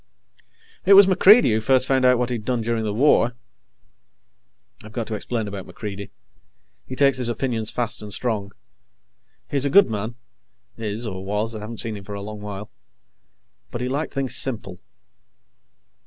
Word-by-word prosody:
It 200 Hz, -, +7 dB
was 200 Hz, 0 st, +10 dB
MacReidie 195 Hz, -, +6 dB
who 110 Hz, +1 st, +1 dB
first 130 Hz, +3 st, +3 dB
found 130 Hz, -1 st, +2 dB
out 125 Hz, -1 st, +5 dB
what 125 Hz, 0 st, -1 dB
he'd 115 Hz, -3 st, -3 dB
done 125 Hz, +1 st, -1 dB
during 115 Hz, 0 st, -1 dB
the 105 Hz, -, -1 dB
war. 120 Hz, +1 st, +3 dB, 1.5 s
I've 110 Hz, 0 st, -12 dB
got 115 Hz, -2 st, -3 dB
to -, -, -3 dB
explain 110 Hz, +1 st, -3 dB
about 100 Hz, -2 st, -7 dB
MacReidie. 100 Hz, -2 st, -7 dB, 0.8 s
He 130 Hz, -, -6 dB
takes 140 Hz, -1 st, +3 dB
his 125 Hz, -2 st, 0 dB
opinions 115 Hz, -2 st, -2 dB
fast 120 Hz, -2 st, -2 dB
and 105 Hz, -1 st, -8 dB
strong. 105 Hz, -3 st, -2 dB, 1.0 s
He's 140 Hz, -2 st, 0 dB
a -, -, +1 dB
good 185 Hz, -, +5 dB
man 110 Hz, +3 st, -3 dB, 0.6 s
is, 110 Hz, +1 st, -4 dB
or 95 Hz, -3 st, -5 dB
was; 105 Hz, +3 st, -2 dB
I -, -, -5 dB
haven't 110 Hz, +2 st, -4 dB
seen 110 Hz, -1 st, -2 dB
him 100 Hz, -, -10 dB
for 100 Hz, +1 st, -7 dB
a 100 Hz, -, -6 dB
long 105 Hz, 0 st, -8 dB
while 105 Hz, 0 st, -7 dB, 1.0 s
but 120 Hz, -, -5 dB
he 125 Hz, -, -2 dB
liked 145 Hz, +4 st, -2 dB
things 135 Hz, -2 st, -2 dB
simple. 110 Hz, -8 st, -2 dB
115 Hz, 170 wpm, -23 LUFS, 105-130 Hz, 1.5 s, was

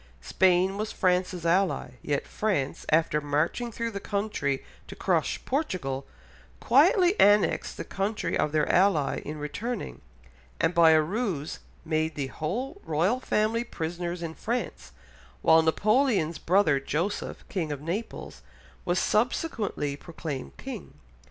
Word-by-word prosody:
Spain 190 Hz, +1 st, +2 dB
was 215 Hz, 0 st, -2 dB
France's 180 Hz, -2 st, 0 dB
ally, 180 Hz, -5 st, +1 dB
yet 145 Hz, -1 st, -1 dB
France 185 Hz, -11 st, -2 dB
after 155 Hz, -1 st, +2 dB
marching 150 Hz, +11 st, -1 dB
through 230 Hz, +1 st, -3 dB
the 200 Hz, -, -4 dB
country 200 Hz, -10 st, -2 dB, 0.2 s
to -, -, -9 dB
crush -, -, 0 dB
Portugal, 180 Hz, -, -2 dB, 0.5 s
quietly 370 Hz, -5 st, +5 dB
annexed 205 Hz, 0 st, +4 dB
the -, -, -4 dB
country 195 Hz, -3 st, -2 dB
of 155 Hz, -, +1 dB
their 155 Hz, -1 st, +1 dB
ally 175 Hz, -7 st, +3 dB
in 150 Hz, +1 st, -6 dB
returning, 205 Hz, +12 st, -5 dB, 0.6 s
and 165 Hz, +2 st, +2 dB
by 170 Hz, -2 st, +6 dB
a 160 Hz, -1 st, +6 dB
ruse 180 Hz, -, -3 dB, 0.3 s
made 160 Hz, 0 st, 0 dB
the 140 Hz, -, -2 dB
whole 245 Hz, -, -4 dB
Royal 175 Hz, +11 st, +1 dB
Family 225 Hz, -1 st, +1 dB
prisoners 175 Hz, -3 st, -4 dB
in 165 Hz, -1 st, -4 dB
France, 240 Hz, +8 st, -4 dB, 0.5 s
while 160 Hz, 0 st, +6 dB
Napoleon's 200 Hz, -, +2 dB
brother 175 Hz, -6 st, +3 dB
Joseph, 165 Hz, +9 st, -3 dB
King 165 Hz, -6 st, -2 dB
of 145 Hz, -, -4 dB
Naples, 175 Hz, +10 st, -5 dB, 0.4 s
was 175 Hz, +1 st, +1 dB
subsequently 215 Hz, -, 0 dB
proclaimed 155 Hz, -2 st, -7 dB
King. 250 Hz, -, -8 dB
180 Hz, 130 wpm, -27 LUFS, 155-215 Hz, 0.6 s, by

